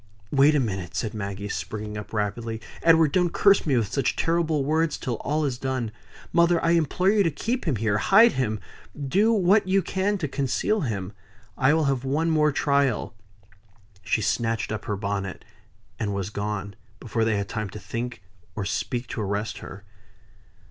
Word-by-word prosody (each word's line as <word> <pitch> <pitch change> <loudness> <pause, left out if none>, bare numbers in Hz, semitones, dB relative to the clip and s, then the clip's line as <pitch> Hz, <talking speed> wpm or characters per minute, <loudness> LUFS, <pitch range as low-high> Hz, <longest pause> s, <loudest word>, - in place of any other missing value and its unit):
"Wait 145 +2 +5
a - - +4
minute!" 95 -8 -3
said 110 - -2
Maggie, 100 -1 -4
springing 105 0 -5
up, 105 0 -7
rapidly. 110 +2 -2 0.2
"Edward, 160 -2 +5
don't 180 0 +2
curse 200 -4 +4
me 135 -4 +3
with 110 -4 -1
such 140 -3 +1
terrible 165 -4 +1
words 160 +1 +1
till 120 -3 -3
all 150 +1 -1
is 125 -3 -2
done. 130 -4 -2 0.4
Mother, 170 0 +4
I 165 - +4
implore 170 +3 +2
you 210 -1 +3
to 175 - +3
keep 235 - -3
him 150 -7 +1
here. 105 -1 0
Hide 220 - +6
him 110 -5 -1 0.4
do 190 +11 +2
what 200 -1 +3
you 190 0 +3
can 195 +4 0
to 160 -6 -2
conceal 140 - 0
him. 100 - -3 0.4
I 135 +4 +3
will 160 - +2
have 135 -3 0
one 155 +5 0
more 150 -1 +3
trial." 140 -5 +1 0.9
She 100 +4 0
snatched 115 -2 0
up 110 -1 -4
her 105 - -2
bonnet, 100 -2 -4 0.5
and 100 -2 -1
was 100 +1 -3
gone, 100 -1 -4 0.2
before 115 -2 -1
they 110 -2 +1
had 100 0 -2
time 105 -4 -4
to 105 - -8
think 115 -2 -5 0.3
or 100 - -3
speak 120 +4 -2
to 110 - -4
arrest 105 +2 -2
her. 95 +1 -10
130 Hz, 180 wpm, -25 LUFS, 105-160 Hz, 0.9 s, Hide